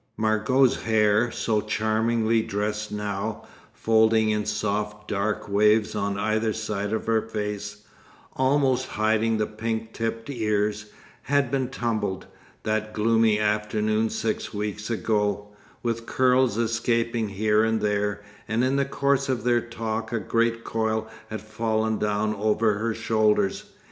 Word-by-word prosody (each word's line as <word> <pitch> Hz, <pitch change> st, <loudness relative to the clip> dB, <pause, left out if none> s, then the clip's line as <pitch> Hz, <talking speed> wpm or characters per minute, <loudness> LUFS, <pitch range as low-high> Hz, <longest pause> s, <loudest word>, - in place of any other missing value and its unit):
Margot's 110 Hz, +4 st, +2 dB
hair, 110 Hz, +1 st, +3 dB
so 110 Hz, -2 st, 0 dB
charmingly 110 Hz, +1 st, +1 dB
dressed 105 Hz, 0 st, -3 dB
now, 105 Hz, +1 st, -3 dB, 0.3 s
folding 110 Hz, -1 st, +3 dB
in 105 Hz, 0 st, -1 dB
soft 105 Hz, 0 st, -2 dB
dark 105 Hz, +1 st, -1 dB
waves 105 Hz, +2 st, +3 dB
on 100 Hz, -1 st, -1 dB
either 110 Hz, +1 st, 0 dB
side 105 Hz, -2 st, -3 dB
her 110 Hz, +1 st, +1 dB
face, 105 Hz, -1 st, -5 dB, 0.5 s
almost 130 Hz, -1 st, +2 dB
hiding 110 Hz, +1 st, +1 dB
the 105 Hz, -, +1 dB
pink 110 Hz, +1 st, -4 dB
tipped 115 Hz, 0 st, -3 dB
ears, 105 Hz, -4 st, -1 dB, 0.3 s
had 140 Hz, -3 st, +1 dB
been 135 Hz, -2 st, 0 dB
tumbled, 110 Hz, -7 st, -2 dB, 0.4 s
that 110 Hz, 0 st, -1 dB
gloomy 110 Hz, 0 st, +3 dB
afternoon 105 Hz, +1 st, +1 dB
six -, -, -2 dB
weeks 105 Hz, +1 st, -4 dB
ago, 105 Hz, -3 st, 0 dB, 0.3 s
with 115 Hz, -1 st, -2 dB
curls 130 Hz, -3 st, +3 dB
escaping 115 Hz, -1 st, 0 dB
here 105 Hz, +2 st, +2 dB
and 110 Hz, 0 st, +1 dB
there; 105 Hz, 0 st, -1 dB, 0.2 s
and 110 Hz, +2 st, +1 dB
in 130 Hz, +2 st, +2 dB
the 140 Hz, -, +2 dB
course 140 Hz, 0 st, 0 dB
of 125 Hz, -2 st, -1 dB
their 120 Hz, -1 st, +3 dB
talk 115 Hz, -1 st, -4 dB
a 115 Hz, -, 0 dB
great 115 Hz, +3 st, 0 dB
coil 110 Hz, -1 st, -1 dB, 0.2 s
had 110 Hz, -, -5 dB
fallen 110 Hz, 0 st, -1 dB
down 105 Hz, 0 st, 0 dB
over 105 Hz, 0 st, +1 dB
her 115 Hz, 0 st, -1 dB
shoulders. 115 Hz, -, +1 dB
110 Hz, 135 wpm, -25 LUFS, 105-115 Hz, 0.5 s, hair